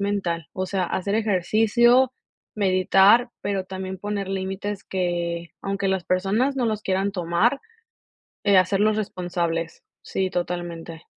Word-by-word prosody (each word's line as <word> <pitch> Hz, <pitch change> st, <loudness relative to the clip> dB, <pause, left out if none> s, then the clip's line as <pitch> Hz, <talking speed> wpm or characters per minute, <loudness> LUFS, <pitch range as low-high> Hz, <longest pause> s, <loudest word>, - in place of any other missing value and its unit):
mental, 195 Hz, -6 st, -1 dB
o 185 Hz, -, -2 dB
sea, 190 Hz, -1 st, -1 dB
hacer 190 Hz, +3 st, -2 dB
ejercicio, 225 Hz, +5 st, +3 dB, 0.5 s
meditar, 195 Hz, +4 st, +5 dB
pero 195 Hz, -2 st, -1 dB
también 190 Hz, 0 st, -6 dB
poner 205 Hz, 0 st, -3 dB
límites, 195 Hz, +1 st, -3 dB
que 170 Hz, -2 st, -2 dB
aunque 195 Hz, 0 st, -1 dB
las 190 Hz, -2 st, 0 dB
personas 200 Hz, +10 st, +1 dB
no 255 Hz, -, +1 dB
los 215 Hz, -2 st, -1 dB
quieran 195 Hz, +1 st, 0 dB
tomar, 180 Hz, +9 st, +1 dB, 0.8 s
eh, 200 Hz, -2 st, +5 dB
hacerlos 200 Hz, +4 st, +3 dB
responsables. 170 Hz, -4 st, -3 dB, 0.2 s
Sí, 190 Hz, -1 st, -2 dB
totalmente. 175 Hz, -2 st, -4 dB
190 Hz, 125 wpm, -24 LUFS, 180-205 Hz, 0.8 s, meditar